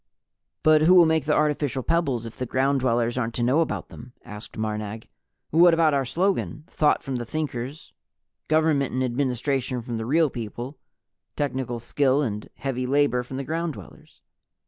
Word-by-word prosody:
"But 155 -1 +5
who 175 +4 +6
will 175 -2 +8
make 160 -2 +1
the 150 - +2
artificial 145 -3 0
pebbles 140 -8 0
if 115 - -8
the 125 - -4
Ground 135 +3 +1
Dwellers 120 -1 +1
aren't 115 -2 -2
to 120 - -1
know 130 +7 +3
about 165 - -3
them?" 120 +1 -12
asked 105 0 -10
Marnag. 110 0 -4 0.4
"What 170 +1 +6
about 160 -2 +3
our 135 -1 +1
slogan 175 0 -1
'Thought 155 -4 +1
from 135 -2 -3
the 120 - -3
Thinkers, 140 +1 -5 0.5
government 155 -3 +2
and 130 +1 0
administration 130 0 -1
from 120 -1 -4
the 110 0 -4
Real 155 +1 +3
People, 120 +4 -6 0.6
technical 130 -4 -2
skill 140 +4 +1
and 105 -5 -4
heavy 130 -2 -3
labor 140 -2 +2
from 130 +2 -7
the 140 - -3
Ground 165 +2 -2
Dwellers'?" 100 - -14
135 Hz, 170 wpm, -25 LUFS, 120-150 Hz, 0.6 s, will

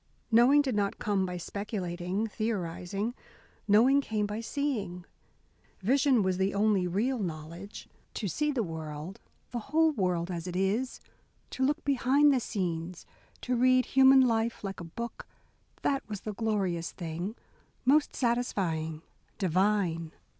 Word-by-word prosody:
Knowing 255 +6 +6
did 265 -3 -1
not 205 -1 0
come 200 -3 0
by 180 0 -4
speculating, 185 0 -3
theorising. 205 -1 -3 0.5
Knowing 245 +7 +5
came 215 -5 -1
by 210 +2 -4
seeing. 220 - -3 0.8
Vision 255 +2 +3
was 185 -1 0
the 195 +1 +1
only 200 -3 +2
real 230 +8 0
knowledge. 170 +2 -6 0.3
To 210 - -2
see 300 - 0
the 255 -5 0
world, 160 +3 -6 0.3
the 240 - -2
whole 320 +2 +4
world, 180 - -1
as 170 0 -4
it 180 - -5
is, 205 +7 0 0.5
to 260 - -2
look 295 +4 +1
behind 280 +2 +4
the 260 - +2
scenes, 175 -5 -3 0.4
to 250 - -1
read 255 +1 +4
human 265 0 +6
life 230 -3 +1
like 195 -1 -5
a - - -6
book, 235 +8 -7 0.6
that 275 -3 0
was 205 -2 -5
the 215 - -5
glorious 195 -6 -1
thing 175 +5 -5 0.5
most 285 +3 +3
satisfying, 175 - -1 0.3
divine. 185 -3 +1
205 Hz, 140 wpm, -29 LUFS, 180-250 Hz, 0.8 s, Knowing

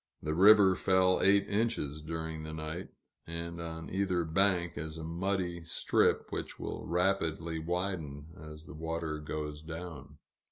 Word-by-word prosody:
The 75 0 -1
river 95 +1 +7
fell 95 0 +3
eight 100 0 +5
inches 100 -9 -1
during 80 0 -4
the 80 0 -6
night, 80 +3 -5 0.4
and 85 0 -4
on 80 -1 -6
either 95 -2 +1
bank 90 +1 +1
is 80 +2 -5
a 80 - -6
muddy 90 +1 -2
strip, 80 - +2
which - - -4
will - - -5
rapidly 85 -2 0
widen 80 -4 -3
as 75 +1 -10
the - - -10
water 80 -1 -3
goes 75 0 -4
down. 80 -3 -8
85 Hz, 145 wpm, -32 LUFS, 80-95 Hz, 0.4 s, river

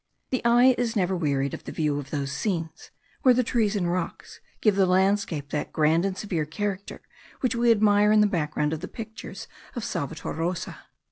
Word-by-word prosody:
The 255 - 0
eye 240 +2 +6
is 240 -2 -1
never 190 -2 +1
wearied 140 -5 0
of - - -7
the - - -6
view 150 -2 0
of 140 -1 -8
those 140 -2 -3
scenes, 165 0 -3 0.3
where 255 -2 +6
the 255 - +3
trees 220 -3 +1
and 175 -4 0
rocks 175 -1 -4 0.2
give 210 -3 +3
the 195 -1 +3
landscape 185 -5 +1
that 150 - -2
grand 160 +3 +2
and 195 -1 -2
severe 180 -6 -2
character 200 +4 -4 0.4
which 255 -1 +1
we 235 0 +2
admire 210 -1 +4
in 215 0 +5
the - - +5
background 150 -5 0
of 160 - -3
the 185 - -6
pictures 220 0 -8 0.3
of 240 - -4
Salvator 155 -4 -4
Rosa. 170 +3 -4
185 Hz, 195 wpm, -26 LUFS, 155-215 Hz, 0.4 s, eye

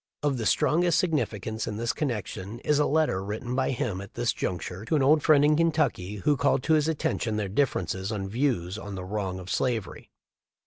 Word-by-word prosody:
Of 140 -4 +1
the 110 - 0
strongest 170 +1 +3
signifi 140 - 0
cance 110 +1 -3
in 105 - -3
this 115 +2 -1
connection 110 - -4
is 150 -1 +2
a 150 - +3
letter 150 -11 +1
written 110 +5 -4
by 130 0 +1
him 105 -6 -2
at 100 - -11
this - - 0
juncture 90 +2 -4
to 155 - 0
an 145 - +3
old 150 +3 +5
friend 145 -2 +5
in 150 +1 +4
Kentucky,* 155 - +1
who 140 +9 +1
called 140 -1 +2
to 160 - +2
his 155 -1 +3
attention 135 -7 -1
their 105 -2 -1
differences 100 -3 -1
of 105 -2 -2
views 100 -4 -1
on 100 0 -7
the 90 -1 -6
wrong 95 -2 -3
of 95 0 -7
slavery. 115 -8 -2
115 Hz, 210 wpm, -27 LUFS, 100-145 Hz, -, old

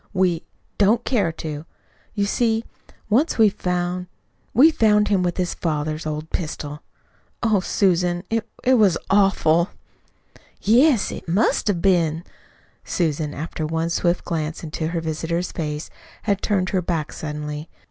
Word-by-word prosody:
"We 180 -3 +2 0.4
don't 220 +4 +3
dare 205 -10 +1
to. 155 -1 -6 0.5
You 200 -1 +1
see, 225 +1 +1 0.4
once 255 +10 +2
we 220 -2 +6
found 180 -1 -2 0.4
we 295 +8 +6
found 210 -6 +3
him 200 -3 +3
with 175 -1 -1
his 180 -1 -1
father's 155 -1 -2
old 155 +1 -4
pistol. 150 -3 -4 0.6
Oh, 220 -3 +3
Susan, 180 -2 +1
it 225 0 -1
it 255 -1 +4
was 195 -6 +4
awful!" 195 -3 +3 0.9
"Yes, 245 +3 +4
it - - -8
must 195 +7 +2
have 180 -5 0
been." 170 -4 +2 0.6
Susan, 155 -3 -1
after 160 +1 -4
one 165 +2 -1
swift 175 0 0
glance 160 -1 -3
into 155 0 -3
her 165 0 -2
visitor's 165 +2 -2
face, 150 -2 -4 0.3
had 200 -3 0
turned 190 -3 +1
her 190 -3 +1
back 165 -4 -2
suddenly. 150 0 -5
175 Hz, 140 wpm, -22 LUFS, 160-205 Hz, 0.9 s, we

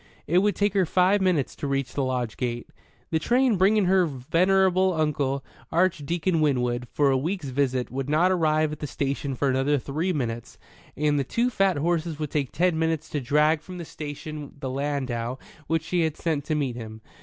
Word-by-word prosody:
It 175 +4 +3
would 205 +1 +2
take 205 -1 +1
her 190 -4 +2
five 185 +4 +3
minutes 180 -8 +1
to 145 - -3
reach 135 -2 -1
the 140 - -1
lodge 125 -4 -2
gate. 120 -1 -3 0.4
The 160 - +2
train 245 - +2
bringing 195 +2 +3
her 185 -1 +4
venerable 185 +7 +2
uncle, 145 -4 -1 0.3
Archdeacon 170 0 +1
Winwood, 125 -4 0
for 145 -2 +3
a 135 - +3
week's 165 0 -3
visit 130 -1 0
would 135 +2 -3
not 170 +5 +3
arrive 155 -3 +2
at 150 - -6
the 150 - -4
station 140 0 -2
for 140 - 0
another 135 +2 +2
three 155 +7 -2
minutes, 120 -7 -4 0.4
and 150 0 +2
the - - +1
two 235 - 0
fat 195 -6 +2
horses 165 0 -1
would 150 -2 -4
take 140 -4 -1
ten 175 -1 +1
minutes 160 -1 -1
to 145 - -2
drag 150 +4 +2
from 180 +3 -9
the 170 - -6
station 150 0 -7
the 130 -2 -4
landau 130 -3 -2 0.3
which 165 -1 0
she 175 +2 0
had 160 -2 -1
sent 155 -4 -1
to 155 - -1
meet 135 -5 -1
him. 110 -2 -8
150 Hz, 195 wpm, -25 LUFS, 135-175 Hz, 0.4 s, her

